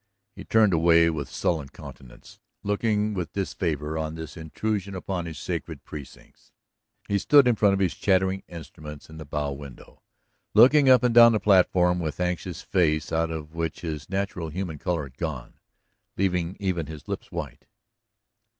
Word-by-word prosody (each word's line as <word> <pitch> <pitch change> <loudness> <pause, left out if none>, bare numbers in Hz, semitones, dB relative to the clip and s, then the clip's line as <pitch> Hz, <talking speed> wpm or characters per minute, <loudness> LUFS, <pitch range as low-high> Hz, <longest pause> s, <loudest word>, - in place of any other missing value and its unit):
He - - -9
turned 110 -4 +3
away 85 0 +4
with 70 -4 -5
sullen 80 -6 -1
countenance, 65 -2 -13 0.2
looking 105 +1 0
with 90 -4 -4
disfavor 80 -5 -2
on 80 0 -3
this 80 0 -8
intrusion 100 +4 -3
upon 90 -1 -4
his 80 -3 -7
sacred - - -5
precincts. 75 -3 -12 0.6
He 100 0 +1
stood 145 +4 +5
in 120 - +5
front 100 -2 +3
of - - -2
his 95 -3 +1
chattering 95 0 +1
instruments 75 -3 -10
in 80 - -11
the 80 - -8
bow 70 0 -3
window, 70 -2 -11 0.5
looking 135 +5 +7
up 125 -2 +6
and 125 -1 +2
down 115 0 +8
the 110 - +1
platform 90 -3 +3
with 80 -1 -4
anxious 90 0 -3
face 80 -4 +1
out 80 0 +1
of 80 -1 -6
which 85 -1 -3
his 80 -2 -5
natural 95 -3 -3
human 85 -2 -5
color 85 -4 -1
had 65 -2 -13
gone, - - -5 0.6
leaving 90 -2 0
even 90 -5 -2
his 80 -2 -10
lips - - -6
white. - - -7
85 Hz, 165 wpm, -25 LUFS, 80-100 Hz, 0.6 s, down